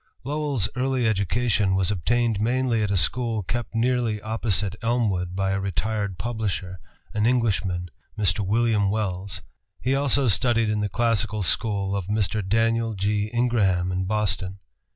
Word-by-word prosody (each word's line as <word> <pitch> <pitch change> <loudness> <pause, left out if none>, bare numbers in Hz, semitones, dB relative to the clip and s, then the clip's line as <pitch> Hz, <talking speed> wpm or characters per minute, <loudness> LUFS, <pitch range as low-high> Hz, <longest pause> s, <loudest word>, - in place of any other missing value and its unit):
] - - -39
Lowell's 145 -6 0
early 130 -2 +1
education 105 -1 +1
was 95 +1 +1
obtained 115 +3 +1
mainly 120 0 +1
at 105 - 0
a 100 - +1
school 115 +2 +1
kept 120 +5 -4
nearly 120 -2 +1
opposite 105 -3 -1
Elmwood 105 -7 0
by 95 0 0
a 95 - 0
retired 100 0 -2
publisher, 100 -6 -3 0.3
an 105 +1 +2
Englishman, 95 -8 0 0.3
Mr. 100 -2 +1
William 105 0 +2
Wells. 100 -3 -3 0.4
He 130 - 0
also 140 -1 +2
studied 115 0 +2
in 105 - 0
the 105 0 -1
classical 110 -1 +1
school 100 0 0
of 95 -3 -3
Mr. 105 0 0
Danial 115 +2 +1
G. 105 +2 0
Ingraham 105 -7 +1
in 95 0 -1
Boston. 100 -2 -1
105 Hz, 150 wpm, -24 LUFS, 95-115 Hz, 0.4 s, an